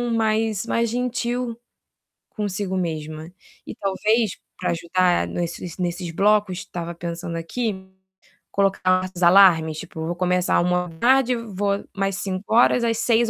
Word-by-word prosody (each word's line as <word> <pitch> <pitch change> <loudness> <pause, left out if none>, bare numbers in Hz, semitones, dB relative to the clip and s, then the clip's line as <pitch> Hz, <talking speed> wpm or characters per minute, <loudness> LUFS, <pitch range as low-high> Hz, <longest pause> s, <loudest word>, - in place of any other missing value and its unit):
mais 220 -1 0
mais 230 -1 0
gentil 245 0 -2 0.7
consigo 200 -2 -3
mesma. 155 -2 -4 0.4
E - - -7
talvez 210 +2 +1 0.3
para 180 - -1
ajudar 175 +1 +1
nesses 175 0 -5
nesses 175 -1 -3
blocos, 200 0 +2
tava 170 -1 -5
pensando 170 0 -5
aqui, 220 +6 -2 0.8
colocar 185 -2 +2
uns 175 - -7
alarmes, 170 -4 +6
tipo 160 0 -6
vou 170 +1 -2
começar 180 0 +1
13:00 180 +9 +2
vou 205 -3 -2
mais 195 -1 -1
5 190 +3 -4
horas, 240 +1 +5
às 230 -1 +1
18:00 235 -1 +2
190 Hz, 125 wpm, -23 LUFS, 175-225 Hz, 0.8 s, alarmes